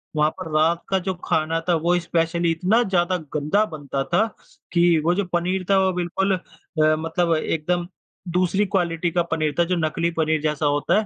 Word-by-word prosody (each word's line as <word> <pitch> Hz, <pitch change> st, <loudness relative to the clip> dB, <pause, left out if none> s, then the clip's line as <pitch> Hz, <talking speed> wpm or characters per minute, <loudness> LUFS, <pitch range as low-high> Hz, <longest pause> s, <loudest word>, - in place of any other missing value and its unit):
वहाँ 150 Hz, 0 st, +3 dB
पर 160 Hz, -, -6 dB
रात 165 Hz, +2 st, +2 dB
का 190 Hz, -1 st, +2 dB
जो 190 Hz, +1 st, -2 dB
खाना 160 Hz, +1 st, +1 dB
था, -, -, +5 dB
वो 170 Hz, +2 st, +2 dB
स्पेशली 170 Hz, 0 st, 0 dB
इतना 190 Hz, +8 st, +2 dB
ज़्यादा 185 Hz, -2 st, +1 dB, 0.2 s
गंदा 155 Hz, +8 st, +2 dB
बनता 140 Hz, -2 st, -3 dB
था, 175 Hz, +9 st, +2 dB, 0.5 s
कि 170 Hz, -1 st, +4 dB
वो 175 Hz, -, +4 dB
जो 200 Hz, +1 st, 0 dB
पनीर 180 Hz, +2 st, 0 dB
था 195 Hz, -, +5 dB
वो 190 Hz, -, +2 dB
बिल्कुल 180 Hz, +2 st, 0 dB
अ, 155 Hz, -3 st, -1 dB
मतलब 165 Hz, +1 st, 0 dB
एकदम 170 Hz, +3 st, -1 dB, 0.4 s
दूसरी 185 Hz, +3 st, +1 dB
क्वालिटी 175 Hz, -3 st, 0 dB
का 175 Hz, -, +1 dB
पनीर 155 Hz, -2 st, 0 dB
था, -, -, +6 dB
जो 180 Hz, +2 st, 0 dB
नकली 165 Hz, 0 st, 0 dB
पनीर 160 Hz, -2 st, 0 dB
जैसा 150 Hz, -1 st, -1 dB
होता 145 Hz, +8 st, +2 dB
है 215 Hz, -, -2 dB
170 Hz, 190 wpm, -23 LUFS, 160-180 Hz, 0.5 s, था